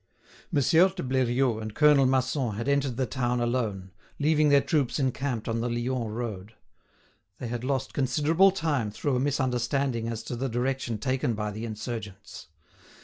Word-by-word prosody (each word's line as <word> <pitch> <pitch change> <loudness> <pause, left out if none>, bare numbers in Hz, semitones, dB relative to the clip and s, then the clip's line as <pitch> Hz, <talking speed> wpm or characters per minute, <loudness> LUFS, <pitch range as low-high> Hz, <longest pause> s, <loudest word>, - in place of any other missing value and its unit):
Monsieur 165 +4 +4
de 190 -1 -6
Bleriot 125 -2 +1
and 110 0 -6
Colonel 150 -3 +5
Masson 130 -3 0
had 115 +5 -4
entered 140 -3 +1
the 130 - +1
town 125 0 -1
alone, 115 -6 -2 0.3
leaving 150 0 +3
their 140 0 +6
troops 140 -3 0
encamped 130 -3 -2
on 115 0 -1
the 120 - -1
Lyons 120 0 -2
road. 110 -2 -5 0.8
They 125 - -6
had 120 0 -4
lost 135 0 -2
considerable 150 +8 +3
time 155 - -1
through 130 +6 -2
a - - +1
misunderstanding 130 -2 0
as 115 -1 -4
to 125 - -5
the 130 +3 -2
direction 125 0 -1
taken 125 +1 -1
by 105 0 -3
the 110 +3 -5
insurgents. 105 -6 -7
125 Hz, 160 wpm, -27 LUFS, 115-140 Hz, 0.8 s, their